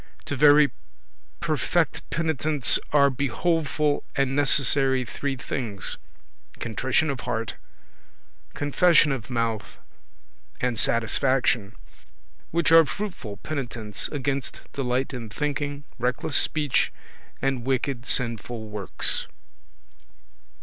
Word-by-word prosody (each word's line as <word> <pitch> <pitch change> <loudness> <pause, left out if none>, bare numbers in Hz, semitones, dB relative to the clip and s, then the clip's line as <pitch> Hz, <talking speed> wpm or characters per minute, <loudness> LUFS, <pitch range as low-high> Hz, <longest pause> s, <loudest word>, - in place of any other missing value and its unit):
To 145 - -3
very 145 0 +6 0.7
perfect - - 0
penitence 155 -3 +1
are 140 -1 +5
behoveful 150 +2 0
and 135 -1 +1
necessary 135 -2 +3
three 140 +3 -3
things: 115 -6 -3 0.5
contrition 130 +7 0
of 135 - -5
heart, 115 -3 -3 1.0
confession 150 +1 +4
of 130 -3 -4
mouth, 115 -3 -2 0.8
and 125 -3 -1
satisfaction; 115 -2 +1 0.7
which 170 0 +1
are 165 0 +9
fruitful 145 - -5
penitence 120 -8 -1
against 140 -2 -3
delight 130 0 -1
in 115 -3 -6
thinking, 145 +2 -3 0.2
reckless 125 +3 -1
speech, 150 -4 +3 0.5
and 135 -3 -1
wicked 130 -1 -1
sinful 115 -2 -2
works. 105 -2 0
135 Hz, 95 wpm, -25 LUFS, 120-145 Hz, 1.0 s, are